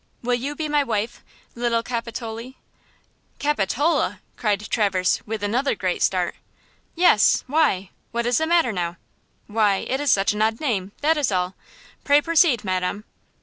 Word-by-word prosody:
Will 245 +1 0
you 270 +4 -2
be 310 +1 -3
my 295 -1 +2
wife, 225 -2 -3 0.3
little 235 -1 0
Capitolie?'" 230 +1 -5 0.8
"Capitola!" 290 - 0 0.2
cried 210 -2 -1
Traverse, 195 -5 +1
with 215 -1 -4
another 245 +7 0
great 185 -3 -2
start. 180 -2 +1 0.6
"Yes! 340 -11 +4
Why? 265 - +1 0.2
What 235 0 -2
is 245 +3 +2
the 320 - 0
matter 335 -7 +3
now?" 175 -3 -3 0.5
"Why, 210 -2 +2
it 265 - -1
is 290 -1 +2
such 200 +2 +3
an 210 - -3
odd 220 +1 +1
name, 205 -10 -1
that 315 +2 +3
is 280 -8 +1
all! 180 0 0 0.5
Pray 285 0 +5
proceed, 320 -6 +3
Madam." 185 +1 -2
230 Hz, 150 wpm, -23 LUFS, 205-285 Hz, 0.8 s, Pray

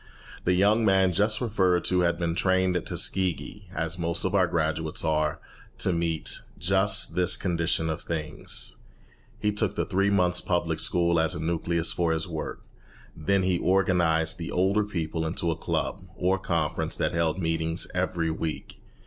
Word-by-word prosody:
The 90 - +3
young 105 +5 +3
man 95 -3 +3
just 105 +4 +1
referred 95 -7 +1
to 90 - +2
had 85 -1 +2
been 85 -2 -1
trained 95 0 +1
at 90 - -2
Tuskegee, 95 +2 -1
as 85 +1 -3
most 85 +1 -1
of 95 - -1
our 95 -3 +4
graduates 80 -2 -1
are, 75 0 0 0.4
to 95 - +1
meet 85 -2 0 0.2
just 95 +3 +2
this 90 -1 +2
condition 85 -2 0
of 80 -1 -3
things. 80 -2 -3 0.6
He 105 - 0
took 105 -1 0
the - - 0
three 100 0 +1
months' 90 -3 +2
public 85 -3 -1
school 85 0 +2
as 80 0 +1
a - - -4
nucleus 85 +1 0
for 85 -2 +1
his 80 +4 -1
work. 80 -3 -5 0.5
Then 100 +4 +1
he 90 -2 +1
organized 85 -4 +2
the 85 - -5
older 95 +4 +2
people 80 -4 -3
into 85 +1 0
a - - -2
club, - - -3
or 95 +1 +1
conference, 80 -5 -2
that - - 0
held 85 -1 +1
meetings 80 -1 -1
every 85 -2 -1
week. 80 -1 -5
85 Hz, 165 wpm, -27 LUFS, 80-95 Hz, 0.6 s, our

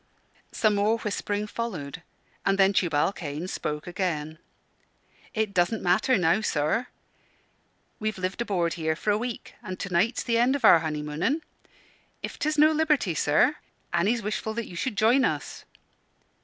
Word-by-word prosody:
_" - - -40 0.5
Some 215 -2 +2
more 205 +3 +2
whispering 210 -1 -2
followed, 180 -10 -5 0.4
and 195 0 +2
then 195 0 +4
Tubal 170 -2 +2
Cain 155 0 -5
spoke 150 -4 -4
again 165 -4 -3 1.0
"It 215 -2 0
doesn't 185 +5 +1
matter 185 +8 +3
now, 180 +3 +3
sir. 165 +6 0 1.1
We've 215 -1 -2
lived 185 +4 -3
aboard 180 -7 0
here 160 -2 -1
for 210 +5 0
a 205 - +2
week, 240 0 -5
and 185 -5 -7
to 195 - -5
night's 220 +8 +2
the 230 -1 +1
end 250 +3 +3
of 285 - 0
our 165 - +8
honeymooning. 160 - -2 0.8
If - - -6
'tis 305 +1 0
no 305 +1 +6
liberty 300 - +2
sir, 155 - +3 0.4
Annie's 205 +7 +1
wishful 215 +1 -3
that 235 -1 -2
you 175 - -10
should 210 +4 -3
join 240 +5 +4
us." - - -2
200 Hz, 155 wpm, -26 LUFS, 170-230 Hz, 1.1 s, our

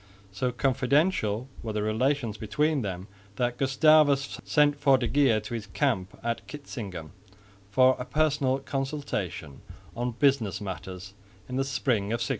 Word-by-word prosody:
So 125 +6 -1
confidential 130 - +1
were 110 -2 -4
the 105 0 -1
relations 115 +1 0
between 150 +8 0
them 95 -2 -5 0.3
that 120 +3 -1
Gustavus 140 0 +3
sent 145 -1 +3
for 135 -2 +5
de 120 -2 -1
Geer 135 -6 +3
to 110 +3 -8
his 110 -3 -4
camp 100 -3 -1
at 115 0 -3
Kitzingen 100 - -7 0.6
for 130 +4 +5
a 125 - -4
personal 140 -2 +1
consultation 135 - -4 0.3
on 120 +1 -2
business 120 -7 +1
matters 95 -1 -7 0.3
in 125 - -4
the 135 - +2
spring 125 -5 0
of 105 - -3
1632. 120 - -3
125 Hz, 145 wpm, -27 LUFS, 105-140 Hz, 0.6 s, for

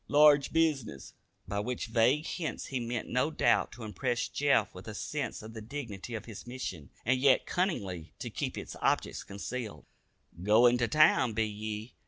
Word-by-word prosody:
Large 145 -1 +6
bizness." 145 - 0 0.3
By 100 - -2
which 120 +4 -2
vague 120 +7 +3
hints 165 -4 -3
he 130 - -3
meant 120 -1 -3
no 130 +5 +1
doubt 160 - +2
to 120 - -9
impress 120 +3 -1
Jeff 145 -1 +2
with 90 +3 -11
a 110 - -6
sense 135 -1 -4
of 110 +1 -9
the 110 - -7
dignity 115 -3 -6
of 110 - -6
his 115 0 -9
mission, 95 - -6 0.2
and 130 +2 +3
yet 135 -1 +4
cunningly 100 - -2
to - - -6
keep - - -3
its - - -6
object - - 0
concealed. 110 +3 -6 0.6
"Goin' 120 +5 +5
to 120 - +2
town, 130 -3 +4
be 110 +1 +1
ye? 105 +2 -5
120 Hz, 175 wpm, -31 LUFS, 105-140 Hz, 0.6 s, Large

